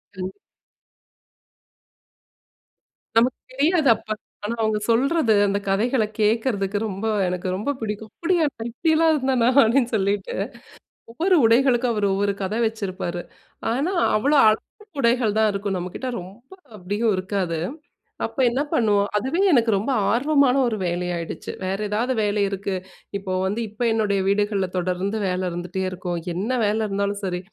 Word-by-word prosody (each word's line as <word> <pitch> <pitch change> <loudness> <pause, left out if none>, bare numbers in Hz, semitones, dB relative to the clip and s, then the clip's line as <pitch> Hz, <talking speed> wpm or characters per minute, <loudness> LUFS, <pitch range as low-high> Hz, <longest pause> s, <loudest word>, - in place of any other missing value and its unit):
கண்டிப். 185 0 -5 2.8
நமக்கு 245 +2 +3
தெரியாது 300 +2 +3
அப்போ. 215 - -5 0.3
ஆனா 230 +3 -2
அவங்க 220 -1 +1
சொல்றது, 255 +1 +3
அந்த 200 0 0
கதைகளை 220 +4 +2
கேட்கறதுக்கு 215 -2 +1
ரொம்ப 200 +2 -4 0.2
எனக்கு 180 +1 -3
ரொம்ப 215 +9 -1
பிடிக்கும். 215 0 -5
அப்படியா! 345 -1 +1 0.2
நான் 225 +1 -4
இப்படிலாம் 320 +5 +3
இருந்தேனா, 260 -4 +2
அப்படின்னு 235 +2 +2
சொல்லிட்டு. 200 -1 -1 0.8
ஒவ்வொரு 355 +10 +2
உடைகளுக்கும் 245 +1 +3
அவர் 210 -1 0
ஒவ்வொரு 200 +1 +1
கதை 210 +4 -2
வச்சிருப்பாரு. 190 -5 -4 0.5
ஆனா 295 +10 0 0.2
அவ்வளோ 280 +8 +3
அளவு 215 0 +2 0.4
உடைகள் 235 -3 +2
தான் 220 -1 +4
இருக்கும் 200 -1 -2
நம்ம 180 0 -4
கிட்ட 260 - -4
ரொம்ப 205 +9 -14 0.2
அப்படியும் 205 +3 0
இருக்காது. 185 -3 -2 0.7
அப்போ - - -7
என்ன 260 +4 -1
பண்ணுவோம்? 205 -3 +2
அதுவே 265 - 0
எனக்கு 235 -6 +4
ரொம்ப 215 +8 -1 0.2
ஆர்வமான 280 +1 +3
ஒரு 220 - -1
வேலையாயிடுச்சு, 175 -1 -3
வேறு 195 +2 -2
ஏதாவது 235 +5 0
வேலை 205 0 +1
இருக்கு 195 0 -3 0.4
இப்போ 195 -1 -5
வந்து 200 +4 -1
இப்போ 215 +4 -5
என்னுடைய 205 -3 +1
வீடுகள்ல 200 -1 +1
தொடர்ந்து 185 +4 -1
வேலை 185 0 -1
இருந்துட்டே 175 +2 -4
இருக்கும். 180 -1 -4
என்ன 195 +7 -3 0.2
வேலை 210 +2 +1
இருந்தாலும் 200 +1 -1
சரி, 180 -1 -2
215 Hz, 135 wpm, -23 LUFS, 195-245 Hz, 2.8 s, தான்